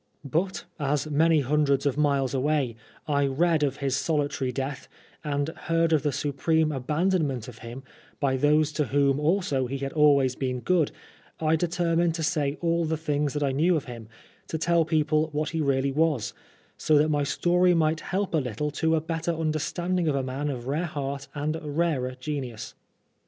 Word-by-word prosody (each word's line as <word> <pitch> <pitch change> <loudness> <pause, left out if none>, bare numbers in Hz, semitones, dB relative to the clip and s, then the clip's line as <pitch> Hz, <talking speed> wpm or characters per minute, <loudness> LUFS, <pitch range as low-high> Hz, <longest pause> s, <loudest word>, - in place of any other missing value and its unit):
But, 170 +7 -1
as 150 +1 -1
many 160 +1 +4
hundreds 140 0 +1
of 140 - +1
miles 140 -3 +1
away, 135 -3 0 0.3
I 140 -2 +2
read 160 +4 +2
of 140 -2 0
his 135 -2 -1
solitary 145 -3 -1
death, 135 +2 -4 0.4
and 145 0 -1
heard 165 0 0
of 155 - +3
the 145 - 0
supreme 155 +3 0
abandonment 150 - 0
of 120 -2 -11
him 120 +2 -8 0.4
by 135 -2 +1
those 150 +3 +3
to 150 0 0
whom 140 0 +2
also 150 -5 +1
he 135 +2 -3
had 135 0 -4
always 140 -4 +4
been 125 -2 -2
good, 175 -2 +2 0.5
I 160 0 +2
determined 170 0 +1
to 165 - -3
say 150 -3 0
all 170 0 +1
the 160 0 -1
things 150 -2 -1
that 145 - 0
I 140 - +1
knew 165 +7 +2
of 155 - -2
him, 115 -4 -9 0.4
to 160 - -3
tell 170 0 +2
people 155 0 +1
what 150 +1 -1
he 165 -1 -1
really 135 -1 +1
was, 150 -4 0 0.4
so 155 - +3
that 150 +2 +3
my 145 -1 +1
story 175 +4 +2
might 160 -1 +2
help 190 +2 -2
a - - +3
little 130 +3 -3
to 160 0 +3
a 155 - +1
better 165 +1 -2
understanding 165 +3 -1
of 150 - +1
a 135 - 0
man 135 +3 -3
of 125 -4 -5
rare 150 +6 -1
heart 140 -2 -4
and 155 +2 -2
rarer 145 -4 -1
genius. 130 -6 -5
150 Hz, 185 wpm, -26 LUFS, 135-160 Hz, 0.5 s, many